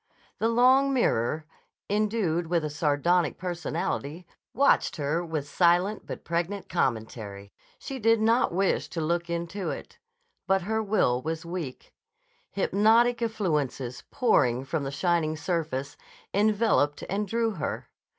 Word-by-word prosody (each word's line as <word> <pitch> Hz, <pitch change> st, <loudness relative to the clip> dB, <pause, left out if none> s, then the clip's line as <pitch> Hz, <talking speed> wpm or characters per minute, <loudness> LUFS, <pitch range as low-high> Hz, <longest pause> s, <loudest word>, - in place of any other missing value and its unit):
The 225 Hz, -, +2 dB
long 260 Hz, +4 st, +5 dB
mirror, 155 Hz, -, +1 dB, 0.4 s
endued 205 Hz, -5 st, 0 dB
with 170 Hz, -2 st, 0 dB
a 150 Hz, -, -3 dB
sardonic 150 Hz, +3 st, +1 dB
personality, 170 Hz, -2 st, -3 dB, 0.3 s
watched 280 Hz, +4 st, +3 dB
her 155 Hz, +3 st, -1 dB
with 160 Hz, -4 st, -4 dB
silent 175 Hz, +6 st, +2 dB
but -, -, -7 dB
pregnant 175 Hz, +4 st, -2 dB
commentary. 110 Hz, -, -3 dB, 0.2 s
She 270 Hz, -1 st, -6 dB
did 225 Hz, 0 st, +4 dB
not 225 Hz, +3 st, +3 dB
wish 190 Hz, +2 st, 0 dB
to 170 Hz, -, -4 dB
look 170 Hz, +2 st, -1 dB
into 170 Hz, +3 st, -3 dB
it. -, -, -7 dB, 0.5 s
But 190 Hz, -1 st, +2 dB
her 220 Hz, +3 st, 0 dB
will 195 Hz, -, +1 dB
was 160 Hz, +3 st, -4 dB
weak. 170 Hz, -7 st, -6 dB, 0.6 s
Hypnotic 225 Hz, +5 st, +3 dB
effluences, 150 Hz, -, -2 dB
pouring 135 Hz, -, +2 dB
from 145 Hz, +1 st, -2 dB
the -, -, -2 dB
shining 155 Hz, 0 st, 0 dB
surface, 145 Hz, -3 st, -2 dB, 0.4 s
enveloped 205 Hz, -8 st, +2 dB
and 205 Hz, +2 st, -2 dB
drew 230 Hz, +2 st, 0 dB
her. 180 Hz, -8 st, -5 dB
175 Hz, 130 wpm, -27 LUFS, 150-210 Hz, 0.6 s, long